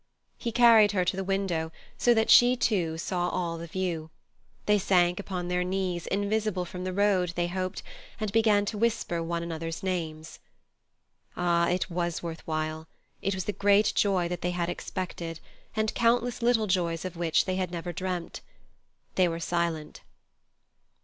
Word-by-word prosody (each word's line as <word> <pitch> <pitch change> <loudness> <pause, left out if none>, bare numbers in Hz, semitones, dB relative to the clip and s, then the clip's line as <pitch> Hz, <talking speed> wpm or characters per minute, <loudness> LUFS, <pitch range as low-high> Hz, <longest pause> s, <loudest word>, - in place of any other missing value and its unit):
He 235 - -2
carried 225 -3 +6
her 185 -2 +1
to 180 - 0
the 195 - -2
window, 190 -4 -1 0.2
so 240 -1 +3
that 220 0 +3
she, 245 +1 +7
too, 180 -10 0
saw 175 +1 -1
all 170 -2 -2
the 170 - -7
view. 165 -2 -3 0.6
They 210 0 +4
sank 180 -2 +3
upon 185 -3 -4
their 180 0 0
knees, 180 -2 -2
invisible 205 -1 0
from 180 +1 -7
the 185 - -2
road, 185 -3 +2
they 175 - +1
hoped, 185 +1 -3 0.4
and 215 -2 -2
began 215 -2 +3
to 205 +1 -4
whisper 225 -7 0
one 170 0 -2
another's 165 0 -5
names. 160 -4 -4 1.0
Ah! 170 -1 +2
it 180 +1 -1
was 175 -1 -2
worth 165 -1 -5
while; 155 0 -3 0.3
it 195 0 -1
was 185 - -4
the 210 - -2
great 205 +1 +4
joy 190 -4 +2
that 175 0 -4
they 180 - 0
had 175 -1 -1
expected, 170 -2 -5 0.4
and 220 -1 0
countless 240 +1 +1
little 235 -2 +3
joys 175 -3 0
of 185 -1 -5
which 165 -2 +2
they 185 -1 -1
had 185 -2 -1
never 175 0 -5
dreamt. 180 0 -4 0.7
They 185 -1 +3
were 165 -1 -3
silent. 170 -3 -2
180 Hz, 170 wpm, -28 LUFS, 170-200 Hz, 1.0 s, she